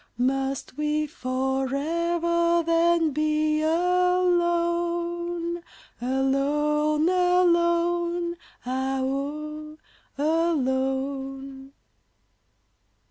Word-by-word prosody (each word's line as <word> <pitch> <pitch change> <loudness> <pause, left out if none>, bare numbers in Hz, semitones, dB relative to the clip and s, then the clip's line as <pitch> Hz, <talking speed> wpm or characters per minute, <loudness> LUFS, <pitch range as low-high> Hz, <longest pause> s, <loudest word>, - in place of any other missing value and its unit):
Must 270 +1 -1
we 300 0 0
forever, 320 +6 0
then, 335 -1 +3
be 305 +1 +1
alone? 345 0 0 0.4
Alone, 295 +4 +1
alone, 345 -1 +2 0.3
ah 265 +1 -1
woe! 305 +3 -4 0.4
alone! 270 -3 -1
310 Hz, 50 wpm, -25 LUFS, 270-340 Hz, 0.4 s, then